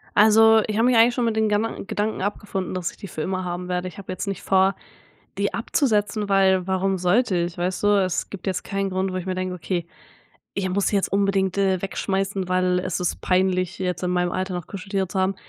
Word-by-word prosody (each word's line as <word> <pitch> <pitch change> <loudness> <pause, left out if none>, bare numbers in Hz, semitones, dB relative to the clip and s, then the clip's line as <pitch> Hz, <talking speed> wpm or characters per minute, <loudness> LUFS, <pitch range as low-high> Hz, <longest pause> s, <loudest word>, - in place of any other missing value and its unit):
Also, 220 +1 +6
ich 215 -1 -2
habe 225 - +3
mich 250 -2 +4
eigentlich 230 +2 +6
schon 245 -1 0
mit 225 -1 0
den 220 -1 +2
Gedan 210 +1 -1
Gedanken 210 0 -2
abgefunden, 195 -2 -3
dass 180 -2 -2
ich - - -19
die 200 - -8
für 155 - -6
immer 185 +3 -2
haben 180 0 -4
werde. 180 0 -2
Ich 180 - -10
habe 195 -2 -7
jetzt 185 - -4
nicht 195 -2 -3
vor, 190 0 +3 0.6
die - - 0
abzusetzen, 210 -5 0
weil 190 -2 +3
warum 190 0 0
sollte 185 +3 +2
ich, 170 0 -1
weißt 180 +1 -2
du? - - +5 0.2
Es 185 - -2
gibt 200 - -8
jetzt 185 -2 -2
keinen 195 0 -2
Grund, 190 0 -1
wo - - -3
ich 185 0 -4
mir 185 - -1
denke: 185 0 -3
„Okay, 175 0 -3 0.7
ich 195 -1 -1
muss 195 +2 0
die 205 - +2
jetzt 195 - +1
unbedingt, 195 -1 +1
äh, 190 -2 +2
wegschmeißen, 195 0 -2
weil 185 0 +2
es 185 -1 -3
ist 180 - -2
peinlich, 185 -1 +1
jetzt 180 -1 -2
in 180 - 0
meinem 180 0 0
Alter 185 0 -2
noch 175 -2 -5
Kuscheltiere 195 -1 -3
zu 190 - -3
haben.“ 190 +1 +1
190 Hz, 235 wpm, -23 LUFS, 185-200 Hz, 0.7 s, Also